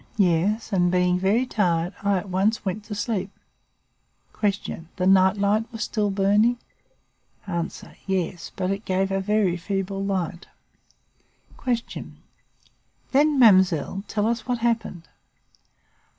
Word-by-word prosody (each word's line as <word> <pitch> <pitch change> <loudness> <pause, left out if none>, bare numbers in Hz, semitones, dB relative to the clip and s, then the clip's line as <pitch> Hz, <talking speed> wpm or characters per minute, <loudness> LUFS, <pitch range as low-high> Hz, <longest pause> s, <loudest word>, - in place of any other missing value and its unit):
Yes, 200 +4 +1
and, 175 -2 +3
being 180 0 +2
very 205 +7 +2
tired, 175 -6 0
I 200 -1 +2
at 185 - -5
once 195 +4 0
went 195 +2 -3
to 210 - -6
sleep. 205 -2 -2 1.1
"Q. 200 -5 -2
The 180 - -1
night 190 +1 +5
light 210 +3 +1
was 225 -2 -4
still 210 -1 -1
burning? 205 +5 +3 0.9
"A. 170 -4 -2 0.4
Yes, 185 -2 -2
but 185 0 -1
it 195 +2 -3
gave 190 0 0
a 195 - +1
very 200 -3 +1
feeble 195 +1 -3
light. 185 -3 -3 1.2
"Q. 240 -3 -3 1.0
Then, 290 +2 +3
mademoiselle, 190 - +4
tell 210 -1 -1
us 230 0 -1
what 250 -1 0
happened. 225 -7 -2
195 Hz, 125 wpm, -24 LUFS, 185-215 Hz, 1.2 s, night